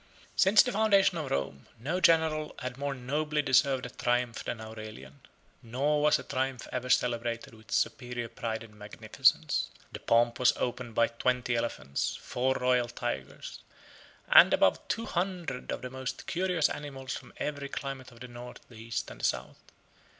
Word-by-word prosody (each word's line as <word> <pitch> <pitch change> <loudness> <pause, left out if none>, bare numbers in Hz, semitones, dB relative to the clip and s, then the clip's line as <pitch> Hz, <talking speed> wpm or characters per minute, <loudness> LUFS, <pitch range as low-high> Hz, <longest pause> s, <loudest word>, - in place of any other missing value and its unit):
] - - -23
Since 195 +3 +6
the 250 - -2
foundation 200 -4 +3
of 150 -4 -4
Rome, 70 0 -3
no 160 +11 -2
general 160 -2 +3
had 125 -1 -5
more 140 +1 -3
nobly 150 +4 -1
deserved 130 -1 +3
a 125 - -7
triumph 120 -1 -1
than 115 - -4
Aurelian; 110 -12 -9 0.4
nor 140 +6 0
was 150 0 +5
a - - -8
triumph 130 -2 -2
ever 125 0 -3
celebrated 120 -1 0
with 110 -1 -17
superior 120 0 -1
pride 115 0 -4
and 110 -2 -14
magnificence. 105 0 +1
77 - - -24
The - - -7
pomp 120 0 +2
was 125 - +4
opened 120 -2 -3
by 115 - +5
twenty 125 +1 0
elephants, 70 - -2
four 130 +2 -1
royal 125 -1 +2
tigers, 65 - -5 0.7
and - - +8
above - - +3
two 230 - -2
hundred 175 -9 -3
of - - -4
the 125 - -5
most 130 0 -5
curious 180 -3 +1
animals 135 -3 -5
from - - -10
every 145 -2 -3
climate 135 -2 -6
of 115 0 -17
the 125 - -7
North, 120 0 -9
the 120 - -13
East, 115 0 -4
and - - -11
the - - +1
South. - - -2
125 Hz, 170 wpm, -30 LUFS, 115-145 Hz, 0.7 s, and